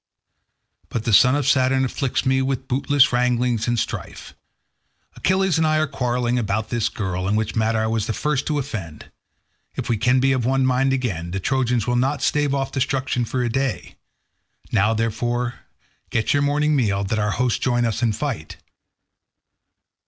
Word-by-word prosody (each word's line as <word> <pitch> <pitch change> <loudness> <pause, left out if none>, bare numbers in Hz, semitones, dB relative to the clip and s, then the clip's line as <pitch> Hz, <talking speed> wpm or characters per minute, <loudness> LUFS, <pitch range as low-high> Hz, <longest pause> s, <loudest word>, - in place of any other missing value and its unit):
But 115 - -3
the 115 - 0
son 125 +6 +6
of 145 -2 -1
Saturn 130 -1 +3
afflicts 130 +1 -2
me 130 0 +2
with 130 -1 -2
bootless 140 +1 +3
wranglings 120 -2 +1
and 120 0 +1
strife. - - -5 0.8
Achilles 190 -3 +1
and 160 - +3
I 155 0 +2
are 155 - +2
quarrelling 125 -3 -1
about 110 -1 -2
this 115 -1 0
girl, 95 -4 -3
in 100 - +1
which 110 0 -1
matter 110 0 +1
I 110 - +1
was 110 -1 -1
the 110 - -1
first 145 +2 -1
to 150 - 0
offend; 105 - -6 0.6
if - - -4
we 115 - +1
can 125 +4 +3
be 135 +1 +3
of 130 -2 0
one 130 +2 +1
mind 130 +1 +2
again, 110 -11 -2
the 95 +3 -3
Trojans 125 0 0
will 120 0 0
not 135 +4 0
stave 145 -2 +1
off 135 -1 -2
destruction 130 -2 -1
for 125 +2 -2
a - - 0
day. 135 +2 -2 0.8
Now, 105 +3 +2
therefore, 120 +2 -2 0.5
get 110 -2 0
your 145 - +2
morning 150 +1 +1
meal, 100 -7 +1
that 110 +3 -1
our 105 0 0
hosts 125 -1 0
join 120 -2 +1
in 115 0 0
fight. 115 - -4
125 Hz, 175 wpm, -22 LUFS, 110-135 Hz, 0.8 s, son